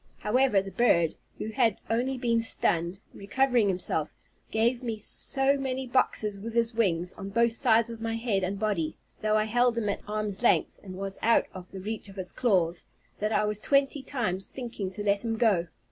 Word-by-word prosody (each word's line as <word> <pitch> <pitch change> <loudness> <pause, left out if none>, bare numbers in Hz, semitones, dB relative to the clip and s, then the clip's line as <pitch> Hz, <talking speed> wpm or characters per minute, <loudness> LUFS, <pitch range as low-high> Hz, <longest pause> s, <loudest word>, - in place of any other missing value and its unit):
However, 210 -3 +2
the 195 - -8
bird, 170 -6 +2 0.2
who 220 - -5
had 225 -3 +1
only 250 +4 -1
been 235 -2 +1
stunned, 175 -5 +1 0.2
recovering 245 +2 +1
himself, 180 -5 -1 0.4
gave 235 +3 +1
me 230 -3 -3
so 270 +6 +4
many 265 -1 -3
boxes 215 -5 0
with 225 +3 -7
his 230 0 +2
wings, 180 -6 0
on 195 - -8
both 230 +2 +1
sides 235 -2 +3
of 230 -1 -9
my 225 0 -2
head 225 -4 -1
and 190 +2 -2
body, 195 -7 -2 0.2
though 215 0 +2
I 215 - +2
held 240 +2 +1
him 210 -3 -1
at 200 - -3
arm's 210 -1 -2
length, 240 - +2
and 185 -2 -9
was 195 0 -4
out 230 +1 +3
of 185 -1 -10
the 195 - -8
reach 215 +1 -4
of 195 - -13
his 185 -2 -4
claws, 180 -8 +1 0.4
that 210 +1 -1
I 215 - +2
was 210 0 -1
twenty 275 +3 +1
times 215 -9 -2
thinking 235 -7 -5
to 190 +2 -5
let 200 0 +1
him 225 -1 -2
go. 200 -7 +2
215 Hz, 195 wpm, -27 LUFS, 195-235 Hz, 0.4 s, so